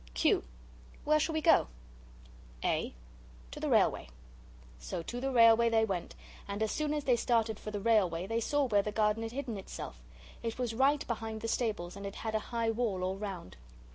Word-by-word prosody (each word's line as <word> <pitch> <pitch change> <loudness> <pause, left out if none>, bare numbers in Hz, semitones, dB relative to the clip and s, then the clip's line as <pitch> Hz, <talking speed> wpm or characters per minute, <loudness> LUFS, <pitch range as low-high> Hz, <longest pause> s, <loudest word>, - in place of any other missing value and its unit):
Q. 60 - +3 0.6
Where 305 +1 +3
shall 320 +2 0
we 315 - 0
go? 330 - +5 1.0
A. - - 0 0.6
To - - -7
the - - -2
railway. 60 - +3 0.7
So 60 - -5
to 240 +7 -5
the 270 - 0
railway 230 -2 +6
they 225 -1 +3
went, 190 -5 -4 0.3
and 200 +2 -2
as 220 - 0
soon 305 -1 -1
as 295 - -2
they 250 -3 +3
started 225 -2 +1
for - - -6
the 210 -1 -3
railway 195 -6 +2
they 225 +3 -1
saw 290 +4 +1
where 205 -4 +3
the 210 - -4
garden 210 +1 +1
had 225 0 -4
hidden 245 -4 -4
itself. - - -8 0.4
It 230 -1 -3
was 245 -3 -2
right 275 +4 +3
behind 220 -2 -4
the 230 - -3
stables, 210 -7 -1
and 200 0 -6
it 195 - -7
had 220 -1 -4
a 220 - +2
high 230 -1 0
wall 220 -5 -1
all 190 +1 -1
round. 190 - -6
225 Hz, 200 wpm, -32 LUFS, 200-240 Hz, 1.0 s, railway